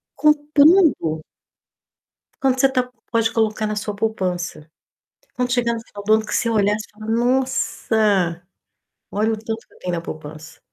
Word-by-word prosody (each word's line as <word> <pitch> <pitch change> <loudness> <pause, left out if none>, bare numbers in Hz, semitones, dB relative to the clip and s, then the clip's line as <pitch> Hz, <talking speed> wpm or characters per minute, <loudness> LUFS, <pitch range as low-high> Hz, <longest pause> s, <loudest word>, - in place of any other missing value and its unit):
Comprando. 300 - +4 1.2
Quanto 260 -1 +2
você 270 - +5
tá 255 -1 0 0.2
pode 230 -1 +1
colocar 220 -1 0
na 215 - -2
sua 210 0 -4
poupança. 180 -7 -3 0.6
Quando 250 -1 -1
chegar 240 -1 +1
no 230 - -5
final 205 -2 -11
do 215 - +3
ano, 220 0 +1
que - - -4
você 230 - +1
olhar, 205 -2 +2
você 215 - -7
fala: 215 +1 -10
"Nossa, 225 -7 +1 0.7
olha 215 +2 0
o 220 - -1
tanto 225 +1 -5
que - - -26
eu - - -21
tenho 180 - -3
na 170 - -2
poupança". 155 0 -9
220 Hz, 160 wpm, -21 LUFS, 200-250 Hz, 1.2 s, você